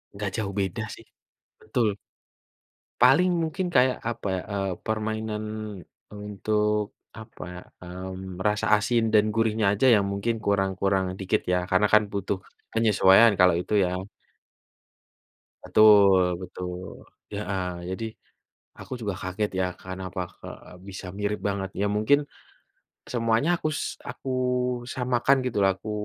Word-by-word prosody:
nggak 100 Hz, 0 st, -3 dB
jauh 100 Hz, -3 st, -3 dB
beda 100 Hz, +4 st, -2 dB
sih. -, -, -16 dB, 0.6 s
Betul. 110 Hz, -2 st, 0 dB, 1.1 s
Paling 180 Hz, +7 st, +6 dB
mungkin 165 Hz, +3 st, -2 dB
kayak, 130 Hz, 0 st, +4 dB
apa 115 Hz, -3 st, -4 dB
ya, 95 Hz, -, -2 dB
eee, 100 Hz, -1 st, -1 dB, 0.2 s
permainan, 110 Hz, 0 st, -2 dB, 0.7 s
untuk, 105 Hz, 0 st, -1 dB, 0.3 s
apa 110 Hz, -, -10 dB
ya, 90 Hz, -, -8 dB, 0.2 s
mmm, 95 Hz, +1 st, -7 dB
rasa 105 Hz, 0 st, 0 dB
asin 115 Hz, +2 st, +1 dB
dan 105 Hz, -1 st, +5 dB
gurihnya 110 Hz, -1 st, +1 dB
aja 105 Hz, +6 st, +1 dB
yang 100 Hz, -2 st, +2 dB
mungkin 100 Hz, +4 st, -1 dB
kurang 95 Hz, -1 st, +2 dB
kurang 95 Hz, -1 st, +2 dB
dikit 95 Hz, -1 st, 0 dB
ya, -, -, +3 dB
karena 95 Hz, +3 st, +3 dB
kan 105 Hz, 0 st, +7 dB
butuh, 100 Hz, 0 st, -1 dB, 0.4 s
penyesuaian 110 Hz, -1 st, +6 dB
kalau 90 Hz, -1 st, +6 dB
itu 100 Hz, -, -5 dB
ya. 90 Hz, +1 st, -2 dB, 1.6 s
Betul 95 Hz, -4 st, +5 dB
betul 90 Hz, 0 st, -7 dB, 0.2 s
heeh. 95 Hz, -1 st, -3 dB, 0.2 s
Jadi, 95 Hz, +5 st, -4 dB, 0.7 s
aku -, -, -8 dB
juga 100 Hz, -3 st, -2 dB
kaget 100 Hz, +3 st, -2 dB
ya, -, -, +2 dB
kenapa 95 Hz, 0 st, -6 dB, 0.2 s
ke -, -, -11 dB, 0.4 s
bisa 95 Hz, -1 st, -8 dB
mirip 105 Hz, 0 st, -1 dB
banget? 100 Hz, -1 st, -2 dB
Ya 105 Hz, -, +2 dB
mungkin, 125 Hz, +7 st, +4 dB, 0.9 s
semuanya 115 Hz, +5 st, +1 dB
akus 155 Hz, -3 st, -2 dB, 0.3 s
aku 125 Hz, +2 st, -7 dB, 0.7 s
samakan, 125 Hz, +1 st, +2 dB
gitu 120 Hz, -4 st, -2 dB
lah, 95 Hz, -, +5 dB
aku 105 Hz, -, -8 dB
105 Hz, 130 wpm, -26 LUFS, 95-110 Hz, 1.6 s, kan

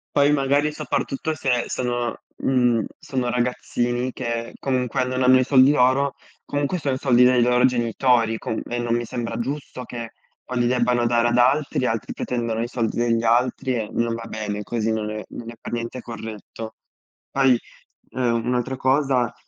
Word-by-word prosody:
Poi, 145 Hz, 0 st, +5 dB
magari, 145 Hz, +1 st, +2 dB
soprattutto 150 Hz, 0 st, -2 dB, 0.3 s
se 130 Hz, -4 st, 0 dB
sono, 120 Hz, -1 st, -2 dB, 0.2 s
mhmm, 125 Hz, -4 st, +2 dB
sono 125 Hz, -2 st, -2 dB
ragazzini 120 Hz, 0 st, -1 dB
che, 115 Hz, -1 st, -4 dB
comunque, 130 Hz, -1 st, 0 dB
non 130 Hz, 0 st, -1 dB
hanno 130 Hz, 0 st, +6 dB
i -, -, +3 dB
soldi 135 Hz, +1 st, +6 dB
loro, 135 Hz, 0 st, +3 dB, 0.3 s
comunque, 145 Hz, +4 st, -1 dB
sono 140 Hz, -5 st, -1 dB
i 130 Hz, -, -3 dB
soldi 125 Hz, -3 st, +4 dB
dei 125 Hz, -1 st, +5 dB
loro 125 Hz, +1 st, +4 dB
genitori 120 Hz, -1 st, +2 dB
com 110 Hz, -, -3 dB
e 120 Hz, -, -2 dB
non 120 Hz, -1 st, -1 dB
mi 120 Hz, -, -1 dB
sembra 115 Hz, 0 st, -4 dB
giusto 130 Hz, 0 st, -5 dB
che, 115 Hz, -1 st, -7 dB, 0.3 s
poi, 125 Hz, -1 st, -3 dB
li 120 Hz, -, +3 dB
debbano 120 Hz, -1 st, +2 dB
dare 120 Hz, 0 st, +3 dB
ad 120 Hz, -, +1 dB
altri. 130 Hz, 0 st, +2 dB
Altri 115 Hz, -1 st, -2 dB
pretendono 115 Hz, -2 st, -2 dB
i 120 Hz, -, -1 dB
soldi 115 Hz, -2 st, -2 dB
degli 115 Hz, -1 st, +1 dB
altri 125 Hz, +3 st, +2 dB
e 110 Hz, -3 st, -3 dB
non 115 Hz, 0 st, 0 dB
va 115 Hz, 0 st, -5 dB
bene. 105 Hz, -2 st, -4 dB
Così 115 Hz, +1 st, -1 dB
non 110 Hz, -1 st, -2 dB
è 110 Hz, 0 st, -5 dB
non 115 Hz, -1 st, -8 dB
è 120 Hz, -, -9 dB
per -, -, -8 dB
niente 120 Hz, +1 st, -4 dB
corretto. 110 Hz, -1 st, -8 dB, 0.6 s
Poi, 135 Hz, -3 st, +4 dB, 0.5 s
uhm, 120 Hz, -2 st, 0 dB
un'altra 125 Hz, +1 st, -1 dB
cosa: 130 Hz, -2 st, +2 dB
120 Hz, 175 wpm, -23 LUFS, 115-130 Hz, 0.6 s, hanno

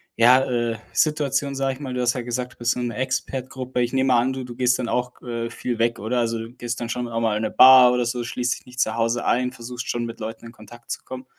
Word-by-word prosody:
ja, 125 Hz, +3 st, +6 dB
äh, 120 Hz, -2 st, -1 dB, 0.2 s
Situationen, 140 Hz, -2 st, +1 dB
sage 135 Hz, 0 st, 0 dB
ich 130 Hz, -, -12 dB
mal. 130 Hz, -3 st, -5 dB
Du 125 Hz, -, -3 dB
hast 120 Hz, -1 st, +2 dB
ja 125 Hz, -, -3 dB
gesagt, 125 Hz, +1 st, -4 dB
du -, -, -30 dB
bist 120 Hz, +1 st, 0 dB
in 125 Hz, -, -2 dB
so -, -, -1 dB
'ner 115 Hz, -, -6 dB
Expat-Gruppe. 130 Hz, 0 st, -3 dB
Ich 120 Hz, 0 st, 0 dB
nehme 130 Hz, 0 st, +1 dB
mal 120 Hz, -, +5 dB
an, 130 Hz, +2 st, 0 dB
du 130 Hz, -1 st, -5 dB
du 120 Hz, -1 st, -9 dB
gehst 125 Hz, 0 st, +2 dB
dann 125 Hz, -, -2 dB
auch, 125 Hz, +1 st, -2 dB
äh, 115 Hz, -1 st, -4 dB
viel 120 Hz, 0 st, -4 dB
weg, 115 Hz, +1 st, +1 dB
oder, 115 Hz, +5 st, -1 dB
also, 115 Hz, -1 st, 0 dB
du 115 Hz, +1 st, -7 dB
gehst 120 Hz, -1 st, -5 dB
dann 120 Hz, -, -4 dB
schon 120 Hz, 0 st, -3 dB
auch 115 Hz, 0 st, -2 dB
mal 110 Hz, -2 st, +1 dB
in 105 Hz, -, -1 dB
'ne -, -, -1 dB
Bar 130 Hz, -1 st, +8 dB
oder 125 Hz, -1 st, +1 dB
so, 120 Hz, +1 st, -2 dB
schließt 125 Hz, +1 st, -2 dB
dich -, -, -28 dB
nicht 125 Hz, 0 st, -12 dB
zu 110 Hz, -3 st, +1 dB
Hause 115 Hz, +1 st, 0 dB
ein, 125 Hz, +1 st, +1 dB
versuchst 125 Hz, 0 st, -7 dB
schon, 120 Hz, 0 st, -1 dB
mit 115 Hz, 0 st, -8 dB
Leuten 110 Hz, +1 st, -6 dB
in 115 Hz, -, -9 dB
Kontakt 120 Hz, +2 st, -13 dB
zu -, -, -4 dB
kommen? 130 Hz, 0 st, -8 dB
125 Hz, 290 wpm, -23 LUFS, 115-130 Hz, 0.2 s, Bar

